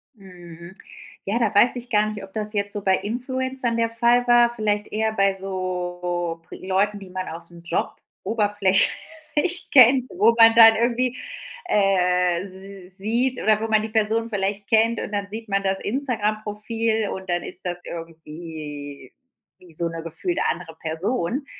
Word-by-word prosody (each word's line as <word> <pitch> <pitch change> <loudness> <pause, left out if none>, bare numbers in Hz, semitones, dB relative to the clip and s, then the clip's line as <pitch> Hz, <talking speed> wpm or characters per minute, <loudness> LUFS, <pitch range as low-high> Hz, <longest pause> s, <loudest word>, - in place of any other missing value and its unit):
Mhm. 175 -3 -13 0.5
Ja, 205 +4 -1
da 225 -3 +1
weiß 225 +5 +4
ich 245 0 -7
gar 210 -1 +2
nicht, 210 -2 -7
ob 195 0 -12
das 215 -1 +1
jetzt 205 -1 -1
so 205 - -4
bei 190 -1 +3
Influencern 250 +2 -2
der 230 0 +1
Fall 235 +2 +2
war, 240 0 +5
vielleicht 210 -2 -1
eher 220 +1 0
bei 195 -2 +2
so 180 -2 -3
Pri - - -11
Leuten, 200 +2 +1
die 195 -2 -11
man 185 0 -5
aus’m 170 +1 -9
Job 170 - -1 0.3
oberflächlich 230 - 0
kennt, 255 0 +6
wo 220 +4 +5
man 225 0 +7
dann 225 -1 +9
irgendwie, 245 +2 0 0.5
äh 180 - +2 0.5
s 185 - -17
sieht, 240 +5 0
oder 215 0 +3
wo 225 - -1
man 220 -1 +3
die 220 - -4
Person 220 +1 0
vielleicht 200 -1 -2
kennt, 225 0 +3
und - - -6
dann 200 -1 -2
sieht 220 +1 -8
man 195 0 +1
das 190 0 +1
Instagram-Profil, 220 -2 -1
und 190 -1 -7
dann 175 0 0
ist 185 +1 -7
das 175 0 -3
irgendwie 155 -3 -9 0.5
wie 180 -2 -16
so 170 +2 -1
'ne 165 0 -6
gefühlte 165 - -2
andere 170 -2 -5
Person, 175 - -3
205 Hz, 165 wpm, -23 LUFS, 180-230 Hz, 0.5 s, dann